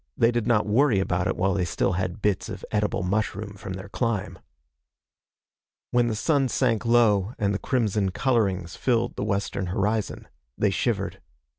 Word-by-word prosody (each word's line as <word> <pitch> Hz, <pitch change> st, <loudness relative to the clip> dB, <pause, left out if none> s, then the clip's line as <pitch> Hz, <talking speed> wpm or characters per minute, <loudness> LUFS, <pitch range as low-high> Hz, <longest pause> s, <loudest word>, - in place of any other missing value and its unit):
They 115 Hz, +1 st, +4 dB
did 120 Hz, -2 st, -1 dB
not 115 Hz, -3 st, +3 dB
worry 110 Hz, 0 st, +3 dB
about 90 Hz, -2 st, 0 dB
it -, -, -1 dB
while 95 Hz, +1 st, +2 dB
they 95 Hz, -2 st, 0 dB
still 85 Hz, -, 0 dB
had 95 Hz, +3 st, -3 dB
bits 100 Hz, -3 st, 0 dB
of -, -, -7 dB
edible 105 Hz, -2 st, 0 dB
mushroom 105 Hz, +1 st, -2 dB
from 95 Hz, -1 st, -7 dB
their 95 Hz, +1 st, -7 dB
climb. 115 Hz, -1 st, -2 dB, 1.5 s
When 120 Hz, -1 st, +3 dB
the 110 Hz, -, -1 dB
sun 135 Hz, +3 st, +1 dB
sank 120 Hz, -3 st, +1 dB
low 115 Hz, -3 st, +3 dB
and 100 Hz, -2 st, +1 dB
the 100 Hz, -, -2 dB
crimson 105 Hz, -6 st, 0 dB
colorings 95 Hz, -6 st, 0 dB
filled 120 Hz, -2 st, 0 dB
the -, -, -3 dB
western 100 Hz, -2 st, -1 dB
horizon, 105 Hz, +3 st, -1 dB, 0.3 s
they -, -, +2 dB
shivered. -, -, -1 dB
105 Hz, 165 wpm, -25 LUFS, 95-115 Hz, 1.5 s, They